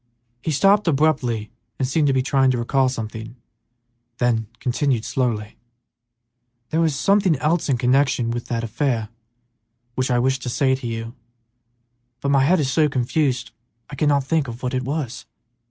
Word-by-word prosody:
He 160 - -3
stopped 195 +7 +3
abruptly 135 -8 +1 0.3
and 130 - 0
seemed 145 +2 +1
to - - +3
be 130 -1 +1
trying 135 0 +3
to 125 - +1
recall 130 +2 +1
something, 110 -1 -6 0.8
then 115 -3 +1
continued, 125 -2 0
slowly, 110 -5 -2 1.1
"There 160 - +2
was 160 -3 +1
something 195 +3 +3
else 155 +3 0
in 130 - +2
connection 130 -1 +2
with 120 0 -4
that 115 -1 -2
affair 115 -1 -1 0.8
which 130 +2 -1
I 125 - +2
wished 130 +1 +1
to 125 - -4
say 130 +2 +2
to 130 -2 -3
you, 115 0 -5 1.1
but 140 +2 -1
my 135 -1 +4
head 175 +6 +3
is 135 -3 0
so 155 0 +3
confused 125 -1 0 0.4
I - - -6
cannot 140 -1 +2
think 155 +1 0
what 125 +2 -5
it 130 - 0
was." 135 -3 -4
130 Hz, 160 wpm, -22 LUFS, 120-145 Hz, 1.1 s, my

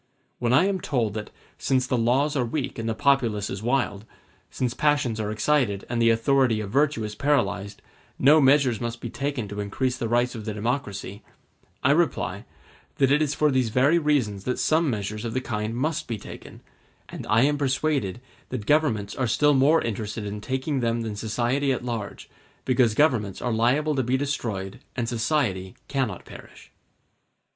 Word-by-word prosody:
When 120 -1 0
I 145 +9 +5
am 195 -2 -1
told 115 -7 -1
that, 105 -1 -5 0.3
since 130 -1 +1
the 130 - 0
laws 130 +6 +2
are 130 - +2
weak 125 +1 -3
and 115 0 -2
the 110 - -1
populace 115 -6 +1
is 95 - -5
wild, 120 -4 0 0.5
since 125 -2 -2
passions 145 -6 +1
are 105 -1 -2
excited 110 -2 +1
and 120 -1 0
the 115 - +5
authority 115 0 +3
of 100 -2 -5
virtue 140 -4 +2
is 105 0 -4
paralyzed, 105 -7 -1 0.3
no 150 +4 +6
measures 135 -4 +4
must 120 0 -4
be 120 - -6
taken 140 -5 -3
to 100 +1 -7
increase 125 +6 -1
the 115 - -2
rights 120 +1 +2
of 110 -3 -7
the 110 -2 -4
democracy, 105 -3 -3 0.6
I - - +4
reply, - - 0 0.5
that 135 -1 +2
it 145 +2 +4
is 150 -2 0
for 150 -1 +2
these 130 -3 +1
very 140 +9 +3
reasons 130 - 0
that 125 - -1
some 160 0 +2
measures 105 -1 -3
of 115 0 -4
the - - +2
kind 110 -2 -3
must 150 +5 -1
be 115 - -3
taken; - - -11 0.5
and - - -8
I 110 +2 +4
am 145 +1 +2
persuaded 135 -5 0 0.3
that 120 -5 -4
governments 120 -10 +1
are 130 - -1
still 145 +7 +3
more 140 +4 +4
interested 105 -1 -4
in 105 +1 -5
taking 130 +4 -2
them 115 -1 0
than 110 -2 -4
society 120 +6 0
at 125 -1 -2
large, 115 -4 -5 0.4
because 125 -4 +3
governments 115 -10 +2
are 120 -2 -1
liable 135 +7 +2
to 135 - +1
be 130 +1 +1
destroyed 115 -9 -3 0.2
and 120 -2 -2
society 110 -6 -1
cannot 130 -10 -2
perish. - - -13
120 Hz, 185 wpm, -25 LUFS, 110-140 Hz, 0.6 s, no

